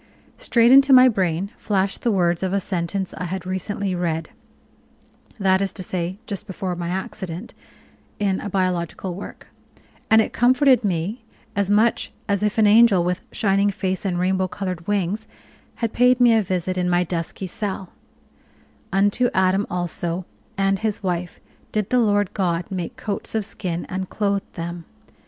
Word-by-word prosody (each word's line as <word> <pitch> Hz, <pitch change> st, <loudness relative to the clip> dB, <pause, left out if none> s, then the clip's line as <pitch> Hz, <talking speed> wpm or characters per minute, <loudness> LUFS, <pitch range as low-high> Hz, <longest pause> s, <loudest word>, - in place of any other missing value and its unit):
Straight 235 Hz, 0 st, +4 dB
into 275 Hz, +1 st, +7 dB
my 255 Hz, 0 st, +9 dB
brain 190 Hz, -3 st, 0 dB
flashed 195 Hz, -2 st, -1 dB
the 240 Hz, -, +1 dB
words 175 Hz, -3 st, +1 dB
of 190 Hz, 0 st, -1 dB
a 200 Hz, -, +2 dB
sentence 185 Hz, 0 st, -3 dB
I 180 Hz, -, -3 dB
had 180 Hz, 0 st, -4 dB
recently 190 Hz, +1 st, -2 dB
read 165 Hz, -3 st, -2 dB, 1.1 s
that 190 Hz, -1 st, +3 dB
is 195 Hz, -, +1 dB
to 185 Hz, -, -4 dB
say, 180 Hz, +1 st, -3 dB
just 205 Hz, 0 st, -5 dB
before 190 Hz, -2 st, -3 dB
my 170 Hz, 0 st, -4 dB
accident 185 Hz, +1 st, -5 dB, 0.6 s
in 195 Hz, -3 st, 0 dB
a 205 Hz, -, -4 dB
biological 185 Hz, -1 st, -1 dB
work, 195 Hz, -, -9 dB, 0.6 s
and 220 Hz, -, +6 dB
it 220 Hz, -, +1 dB
comforted 255 Hz, +1 st, +4 dB
me 200 Hz, +5 st, -2 dB, 0.3 s
as 200 Hz, -1 st, 0 dB
much 215 Hz, +3 st, +2 dB, 0.2 s
as 200 Hz, -2 st, 0 dB
if 210 Hz, 0 st, 0 dB
an 220 Hz, -, +5 dB
angel 210 Hz, -3 st, +6 dB
with 180 Hz, +1 st, -1 dB
shining 200 Hz, -1 st, +2 dB
face 190 Hz, -1 st, -2 dB
and 185 Hz, -3 st, -1 dB
rainbow 185 Hz, +1 st, +1 dB
colored 185 Hz, -3 st, -5 dB
wings 205 Hz, +1 st, -1 dB, 0.6 s
had 225 Hz, -, -3 dB
paid 250 Hz, +1 st, +4 dB
me 240 Hz, -2 st, +6 dB
a 225 Hz, -, +4 dB
visit 185 Hz, -1 st, -2 dB
in 180 Hz, 0 st, 0 dB
my 175 Hz, 0 st, +3 dB
dusky 170 Hz, +2 st, -4 dB
cell: 190 Hz, 0 st, -4 dB, 1.0 s
"Unto 205 Hz, +6 st, +2 dB
Adam 190 Hz, +2 st, +2 dB
also, 175 Hz, 0 st, -3 dB, 0.3 s
and 195 Hz, 0 st, +1 dB
his 220 Hz, -2 st, -2 dB
wife, 175 Hz, -2 st, -3 dB, 0.3 s
did 210 Hz, -2 st, -2 dB
the 250 Hz, -, +4 dB
Lord 205 Hz, -4 st, +2 dB
God 175 Hz, -3 st, 0 dB
make 180 Hz, -3 st, -4 dB
coats 205 Hz, +1 st, -4 dB
of 220 Hz, -2 st, 0 dB
skin 180 Hz, -5 st, -4 dB
and 185 Hz, -1 st, -4 dB
clothed 200 Hz, -2 st, -1 dB
them. 170 Hz, 0 st, -5 dB
190 Hz, 165 wpm, -22 LUFS, 180-210 Hz, 1.1 s, my